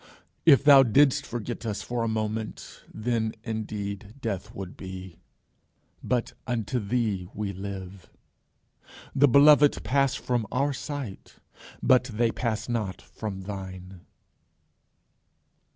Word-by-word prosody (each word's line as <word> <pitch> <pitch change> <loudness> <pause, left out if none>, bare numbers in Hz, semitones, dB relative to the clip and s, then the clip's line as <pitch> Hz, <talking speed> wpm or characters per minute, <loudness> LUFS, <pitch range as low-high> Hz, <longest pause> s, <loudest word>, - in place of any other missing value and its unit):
If 140 -3 +7
thou 140 -2 +9
didst 135 +3 +4
forget 120 0 -5
us 110 -3 -3
for 120 -1 -3
a 115 - 0
moment 110 0 -4
then 110 0 -1
indeed 105 -2 -5
death 105 -4 -4
would 95 -2 -7
be. 95 -1 -9 0.8
But 125 -2 -1
unto 120 0 -1
thee 105 -4 -1
we 100 -1 -3
live. 95 -1 -7 1.0
The 145 +1 +5
beloved 145 +2 +6
pass 135 +4 +2
from 120 -4 -1
our 140 +3 +1
sight, 135 -6 -6 0.5
but 130 -1 +5
they 115 -1 0
pass 110 -2 -2
not 110 -6 -2
from 100 -3 -7
thine. 95 -2 -8
110 Hz, 115 wpm, -27 LUFS, 100-125 Hz, 1.0 s, thou